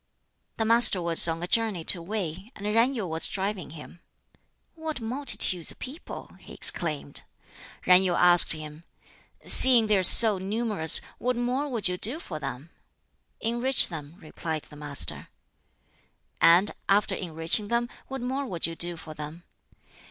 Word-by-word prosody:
'" - - -50
The 225 - -3
Master 230 -3 +4
was 170 -1 +5
on 165 +1 -5
a - - -5
journey 215 -5 -2
to 170 - +2
Wei, 190 +1 -8
and 205 - -11
Yen 230 +6 -1
Yu 220 -5 -5
was 160 -1 -4
driving 195 -2 -6
him. 160 +3 -14 0.7
"What 320 -3 -8
multitudes 225 - -3
of - - -18
people!" 280 +6 -12
he - - -15
exclaimed. 150 -4 0 0.6
Yen 180 0 +4
Yu 180 -2 -2
asked 175 0 +4
him, 155 0 -12 0.6
"Seeing 245 -4 +8
they 210 -2 0
are - - -1
so 210 +2 +8
numerous, 200 -4 +1 0.2
what 250 +1 -3
more 250 +4 -4
would 230 -7 -2
you 180 0 -5
do 240 - +2
for 160 - -10
them?" 145 +4 -10 0.7
"Enrich 240 +4 0
them," 155 -2 -11
replied 160 -3 -8
the 150 - -16
Master. 145 - -2 1.1
"And 175 +5 +3 0.2
after 200 0 0
enriching 170 +3 -3
them, 235 +2 -3 0.2
what 270 -1 -8
more 265 +3 -5
would 175 -7 -4
you 165 - -5
do 175 0 -2
for 160 -1 -12
them?" 155 +3 -11
190 Hz, 160 wpm, -24 LUFS, 165-230 Hz, 1.1 s, Seeing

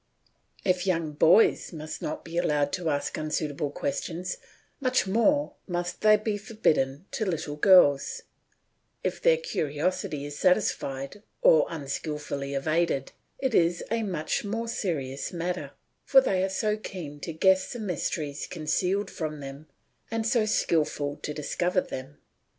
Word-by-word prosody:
If 185 0 +1
young 165 -4 +1
boys 160 +8 +4
must 155 -1 -7
not 150 - -4
be 165 - -8
allowed 150 -4 +1
to 175 -3 -1
ask 145 -1 -1
unsuitable 155 -1 -2
questions, 180 - -3 0.4
much 255 -5 +2
more 285 +9 +2
must 175 -1 -3
they 215 0 +6
be 210 -1 -2
forbidden 160 -9 0
to 220 - -2
little 160 -6 -2
girls; 150 -4 +5 0.8
if - - -2
their - - +5
curiosity 155 - -2
is 145 0 -7
satisfied 140 -2 0 0.2
or - - +6
unskilfully 145 -2 -4
evaded 155 0 0 0.3
it 265 -3 -1
is 170 -2 +3
a 230 0 +1
much 180 -7 -2
more 225 +3 -3
serious 140 - -3
matter, 170 -4 -3 0.3
for 270 - +7
they 195 -8 +1
are 190 - +1
so 210 +3 0
keen 170 -9 -7
to 165 - -5
guess 190 +4 +3
the - - -5
mysteries 155 -7 -3
concealed 180 +5 -1
from 155 -2 -4
them 140 +2 -9 0.4
and 225 0 -2
so 225 -1 +2
skilful 150 -7 0
to - - -5
discover 175 +5 0
them. 135 -1 -8
170 Hz, 140 wpm, -27 LUFS, 150-205 Hz, 0.8 s, for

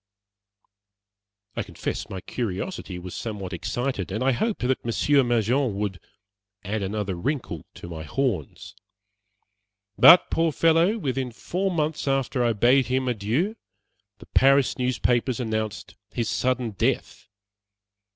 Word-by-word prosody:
I - - -1
confess 100 -5 -5
my 95 - -6
curiosity 105 - -4
was 90 0 -8
somewhat 100 -5 -5
excited, 105 +1 -3
and 110 +6 -2
I 135 - +3
hoped 210 - -1
that 130 +1 0
Monsieur 140 +5 +3
Mangin 120 0 +1
would 100 -3 -3 0.6
"add 105 +2 -2
another 100 0 -2
wrinkle 90 - -3
to - - -9
my 80 -2 -7
horns." 80 - -3 1.3
But, 175 +2 +8
poor 165 0 +2
fellow! 165 +7 +3
within 135 - -2
four 170 - -2
months 155 -4 -1
after 135 -2 +1
I 120 -1 +2
bade 125 +5 +4
him 130 +1 0
adieu, 125 - 0 0.6
the - - -14
Paris 135 0 +4
newspapers 125 0 +1
announced 110 -3 -3
his 115 -2 -2
sudden 125 -2 0
death. 100 - -2
120 Hz, 125 wpm, -25 LUFS, 105-135 Hz, 1.3 s, But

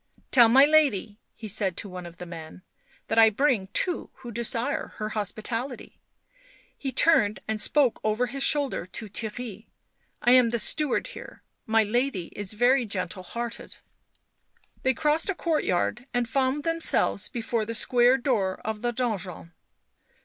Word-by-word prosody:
" - - -31
Tell 240 -3 +7
my 265 +4 +7
lady," 270 -9 +2 0.3
said 200 -2 0
he - - -31
to 200 - -6
one 180 -1 -8
of 170 0 -13
the 180 - -8
men, 170 +1 -10 0.2
" - - -34
that 225 - +2
I 225 0 +8
bring 220 -3 +1
two 350 - -1
who 245 -2 -10
desire 235 +4 -1
her 215 0 -4
hospitality 225 +4 -4 0.4
;" - - -30 0.3
he 270 - -5
turned 250 -7 +3
and 215 -1 -1
spoke 280 -6 +3
over 215 +3 +1
his 270 +3 -5
shoulder 280 - +1
to 220 +3 -6
Theirry, 220 0 -6 0.3
" - - -44
I 240 - +4
am 250 -2 +6
the 235 - -1
steward 295 +4 +2
here, - - -11 0.2
my 225 0 +3
lady 215 -4 -2
is 205 0 -1
very 245 +4 +3
gentle 185 -3 -4
hearted." 235 +6 -6 1.0
They 260 -1 +1
crossed 310 +5 +1
a 395 - 0
courtyard 250 - -1
and 245 -1 +1
found 265 +4 0
themselves 330 -10 0
before 230 -1 -2
the 230 +2 -5
square 245 +2 +4
door 215 -8 -1
of 220 -1 -4
the 240 0 0
donjon. 200 -8 -4
230 Hz, 165 wpm, -26 LUFS, 205-260 Hz, 1.0 s, I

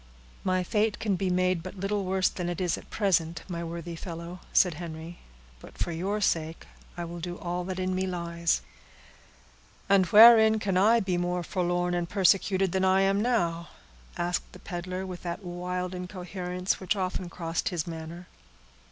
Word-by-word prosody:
"My 185 -1 +1
fate 210 +2 +1
can 205 -3 0
be 185 +1 -1
made 180 -1 +1
but 185 +3 -8
little 200 +1 -1
worse 185 0 +2
than 175 -1 -3
it 175 - -3
is 180 -3 +1
at - - -12
present, 175 -5 0
my 170 -2 -4
worthy 170 0 -6
fellow," 170 +1 -7
said 180 -3 +4
Henry; 165 +1 -8 0.4
"but - - -14
for - - -2
your 190 +6 -2
sake 165 -5 -1 0.3
I 175 - -3
will 170 +1 -7
do 175 +1 -5
all 175 0 -3
that 185 0 -4
in 185 0 -1
me 190 +1 -1
lies." 170 -2 -1 1.2
"And 195 -2 +4
wherein 220 +2 +8
can 200 -3 -1
I 220 +5 +5
be 185 -3 0
more 175 0 -1
forlorn 175 0 0
and 175 -1 -1
persecuted 195 -1 +3
than 190 +1 0
I 190 0 +4
now 200 -5 +1
am?" 170 - -11 0.6
asked 175 0 -3
the - - -10
peddler, 180 0 -5
with 180 -2 -7
that 175 +3 -5
wild 180 +1 -3
incoherence 180 0 -3
which 190 +2 0
often 185 -2 -3
crossed 165 -1 -2
his 170 -5 -2
manner. 165 +1 -7
180 Hz, 175 wpm, -28 LUFS, 170-190 Hz, 1.2 s, wherein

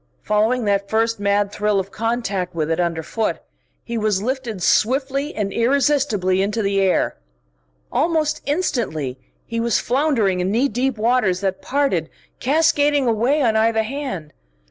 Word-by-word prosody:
Following 220 +3 +1
that 200 -1 0
first 225 0 +1
mad 200 0 +1
thrill 210 -1 +1
of 195 +1 -5
contact 210 -6 -2
with 160 -1 -1
it 165 - 0
underfoot, 170 +5 -1 0.5
he 235 -1 -3
was 210 -3 +1
lifted 235 -4 -3
swiftly 275 +7 +1
and 200 -2 -2
irresistibly 240 -7 +2
into 210 +3 -1
the 195 0 +1
air. 190 -1 +1 0.7
Almost 310 +2 +1
instantly 215 - -1 0.3
he 230 -1 -3
was 235 0 +1
floundering 240 -8 +1
in 180 +1 0
knee 240 +7 +2
deep 250 +1 -1
waters 215 -5 +1
that 195 -1 -2
parted, 265 - 0 0.3
cascading 290 0 +2
away 240 +6 +2
on 225 -3 +2
either 220 0 +2
hand. 230 - -5
225 Hz, 145 wpm, -21 LUFS, 195-265 Hz, 0.7 s, irresistibly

